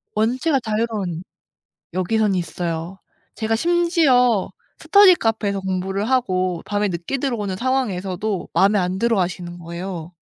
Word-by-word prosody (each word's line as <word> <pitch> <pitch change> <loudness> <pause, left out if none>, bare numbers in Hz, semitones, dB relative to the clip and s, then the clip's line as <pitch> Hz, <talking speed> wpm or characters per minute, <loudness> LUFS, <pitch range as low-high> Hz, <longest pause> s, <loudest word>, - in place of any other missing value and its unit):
원체가 255 +7 +1
자유로운 215 -6 -2 0.7
여기선 200 +2 +1
있어요. 170 0 -3 0.4
제가 225 0 0
심지어 305 - +3 0.3
스터디 400 -2 +6
카페에서 215 - -1
공부를 190 +3 -2
하고 185 -9 0
밤에 205 0 0
늦게 175 +8 -3
들어오는 230 -8 -2
상황에서도 200 -5 -2
마음에 200 +2 +4
안 180 0 -1
들어하시는 180 -5 -1
거예요. 170 0 -6
200 Hz, 320 characters per minute, -21 LUFS, 180-235 Hz, 0.7 s, 스터디